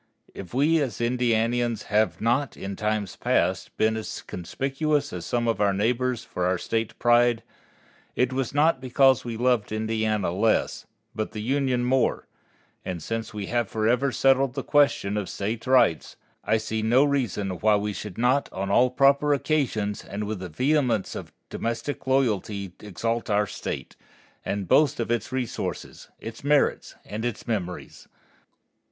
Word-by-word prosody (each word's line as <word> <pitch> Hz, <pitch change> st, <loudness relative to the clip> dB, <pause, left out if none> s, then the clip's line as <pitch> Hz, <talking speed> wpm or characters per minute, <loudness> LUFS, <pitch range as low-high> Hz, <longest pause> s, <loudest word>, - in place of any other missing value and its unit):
If 90 Hz, -, -9 dB
we 150 Hz, +5 st, +3 dB
as 130 Hz, -5 st, -3 dB
Indianians 120 Hz, -1 st, +1 dB
have 105 Hz, +1 st, +1 dB
not, 120 Hz, +5 st, 0 dB
in 100 Hz, 0 st, -5 dB
times 105 Hz, -2 st, -2 dB
past, -, -, 0 dB
been 110 Hz, 0 st, +2 dB
as 110 Hz, -, -5 dB
conspicuous 140 Hz, -, -2 dB
as 90 Hz, -2 st, -5 dB
some 120 Hz, -1 st, 0 dB
of 115 Hz, -2 st, 0 dB
our 100 Hz, -1 st, +3 dB
neighbors 120 Hz, +3 st, 0 dB
for 90 Hz, -6 st, -2 dB
our 90 Hz, 0 st, +1 dB
State 115 Hz, +4 st, -2 dB
pride, 120 Hz, -1 st, +3 dB, 0.7 s
it 125 Hz, +1 st, +1 dB
was 130 Hz, -2 st, -1 dB
not 145 Hz, -1 st, +2 dB
because 130 Hz, +1 st, +3 dB
we 115 Hz, -2 st, -5 dB
loved 120 Hz, -3 st, +1 dB
Indiana 110 Hz, -3 st, 0 dB
less, 110 Hz, +5 st, 0 dB, 0.3 s
but 110 Hz, -2 st, -4 dB
the 105 Hz, -, -5 dB
Union 130 Hz, 0 st, +1 dB
more; 130 Hz, 0 st, +1 dB, 0.6 s
and 90 Hz, -4 st, -5 dB
since 115 Hz, 0 st, -4 dB
we 105 Hz, -2 st, -5 dB
have 120 Hz, +2 st, -1 dB
forever 120 Hz, +5 st, +1 dB
settled 135 Hz, +1 st, +3 dB
the 135 Hz, -, -3 dB
question 140 Hz, -8 st, +2 dB
of 100 Hz, -3 st, -3 dB
State 110 Hz, +4 st, -4 dB
rights, 130 Hz, -10 st, +3 dB, 0.3 s
I 110 Hz, -, +2 dB
see 110 Hz, 0 st, -3 dB
no 120 Hz, +5 st, +4 dB
reason 120 Hz, -9 st, 0 dB
why 110 Hz, -1 st, +4 dB
we 105 Hz, 0 st, -1 dB
should 100 Hz, -2 st, -7 dB
not 125 Hz, +4 st, +2 dB
on 95 Hz, +1 st, -3 dB
all 125 Hz, +5 st, +5 dB
proper 140 Hz, +3 st, +4 dB
occasions 125 Hz, -9 st, -1 dB
and 100 Hz, +1 st, -5 dB
with 105 Hz, -1 st, -4 dB
the 90 Hz, -1 st, -6 dB
vehemence 125 Hz, -, +1 dB
of -, -, -7 dB, 0.2 s
domestic 115 Hz, +5 st, -4 dB
loyalty 105 Hz, -7 st, 0 dB
exalt 115 Hz, +4 st, -3 dB
our 105 Hz, 0 st, +2 dB
State, -, -, -6 dB, 0.5 s
and 100 Hz, -2 st, -3 dB
boast 145 Hz, -, +4 dB
of 115 Hz, -, -1 dB
its 120 Hz, +2 st, -1 dB
resources, 130 Hz, -3 st, -4 dB
its 115 Hz, +3 st, -8 dB
merits, 145 Hz, 0 st, +1 dB
and 110 Hz, +2 st, -5 dB
its 120 Hz, -3 st, -4 dB
memories. 95 Hz, -6 st, -4 dB
115 Hz, 160 wpm, -25 LUFS, 105-130 Hz, 0.7 s, all